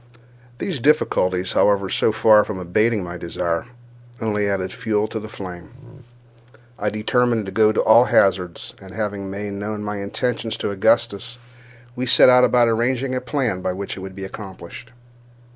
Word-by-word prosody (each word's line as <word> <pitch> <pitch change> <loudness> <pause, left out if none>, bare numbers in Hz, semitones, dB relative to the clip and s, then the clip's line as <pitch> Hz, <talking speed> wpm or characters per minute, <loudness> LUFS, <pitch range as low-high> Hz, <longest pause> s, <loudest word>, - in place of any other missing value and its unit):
These 165 +1 -4
difficulties, 95 - +1
however, 100 -1 +3
so 110 - +1
far 110 -1 +5
from 105 - -6
abating 105 +4 0
my 85 0 -7
desire, 85 +2 -3 0.5
only 105 -2 -1
added 95 -1 -2
fuel 110 -3 -1
to 110 - -4
the 110 0 -9
flame. 120 +9 -11 0.8
I 105 - 0
determined 115 +1 0
to 95 - -6
go 110 +2 +4
at 110 - -2
all 115 +3 +6
hazards; 90 -6 +1
and, 95 -2 -12
having 100 -2 -4
made 100 +1 -5
known 105 +1 -5
my 105 0 -4
intentions 115 +3 -3
to - - -3
Augustus, 115 +3 0 0.6
we 125 +1 -3
set 125 - +7
about 125 -1 +4
arranging 125 +3 0
a 130 - -2
plan 125 -7 -2
by 90 - -2
which 100 +1 -5
it 95 - -9
might 95 0 -8
be 95 - -7
accomplished. 95 +3 -10
105 Hz, 160 wpm, -21 LUFS, 95-120 Hz, 0.8 s, set